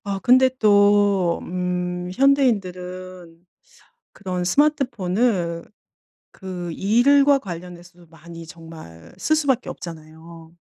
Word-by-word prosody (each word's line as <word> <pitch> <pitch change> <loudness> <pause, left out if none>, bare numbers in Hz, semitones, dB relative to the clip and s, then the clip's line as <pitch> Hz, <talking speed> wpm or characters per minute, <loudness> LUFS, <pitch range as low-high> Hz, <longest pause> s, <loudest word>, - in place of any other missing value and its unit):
아 200 -1 -3
근데 255 +1 +5
또 205 -4 +3
음 180 0 -4
현대인들은 185 -9 -1 0.7
그런 185 -3 -5
스마트폰을 205 - 0 0.7
그 180 -3 -7
일과 275 - +3
관련해서도 175 -3 -11
많이 165 +1 -13
정말 160 - -13
쓸 310 - 0
수밖에 275 -5 -1
없잖아요. 165 0 -11
180 Hz, 210 characters per minute, -21 LUFS, 170-215 Hz, 0.7 s, 근데